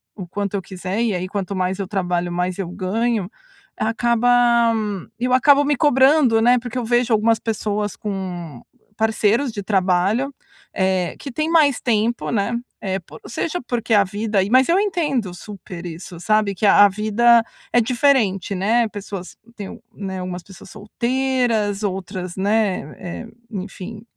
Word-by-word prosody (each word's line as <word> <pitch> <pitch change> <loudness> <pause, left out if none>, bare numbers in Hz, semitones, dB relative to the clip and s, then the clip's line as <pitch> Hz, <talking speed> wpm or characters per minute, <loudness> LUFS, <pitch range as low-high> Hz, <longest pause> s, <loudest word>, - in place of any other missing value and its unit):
o 190 -4 -7
quanto 200 +2 -3
eu 195 - -1
quiser, 190 +3 -4
e 225 -4 +1
aí 180 +1 -3
quanto 200 -1 -3
mais 185 +1 -1
eu 195 - -3
trabalho, 180 -3 -1
mais 180 +2 -2
eu 185 - -2
ganho, 210 +2 -1 0.5
acaba 235 +1 +3 0.4
eu 250 +1 -1
acabo 280 +2 +5
me 290 0 +1
cobrando, 265 -4 +4
né, 245 +1 +5
porque 245 0 -6
eu 245 - -2
vejo 240 0 +2
algumas 220 +1 +3
pessoas 210 -2 -2
com 180 - -5 0.4
parceiros 220 +4 +1
de 210 -2 -5
trabalho, 195 +7 +1 0.4
eh, 190 -2 0
que 280 - -7
têm 310 +5 -2
mais 300 -5 +3
tempo, 235 0 0
né? 225 +1 0 0.3
Eh, 190 -1 -2
por - - -14
seja 330 +9 -3
porque 230 -2 -1
a 200 -1 +5
vida 205 +1 -1
e 195 - -2
mas 255 +3 +4
eu 355 +3 +4
entendo 295 - -1
super 180 -2 -9
isso, 170 +1 -8
sabe, 210 +1 +1
que 210 - -1
a 205 0 +7
a - - +5
vida 225 +3 +4 0.3
é 245 - +5
diferente, 225 -6 +1
né, 225 +5 +2
pessoas 200 -3 -7 0.2
têm 200 -3 -6
o - - -11
né, 190 -2 -5
algumas 180 -1 -5
pessoas 195 0 -14
solteiras 235 -1 -1
outras, 185 -2 -4
né, 200 -5 0
eh, 175 +6 -6 0.2
enfim, 200 +1 -7
210 Hz, 160 wpm, -21 LUFS, 190-240 Hz, 0.5 s, a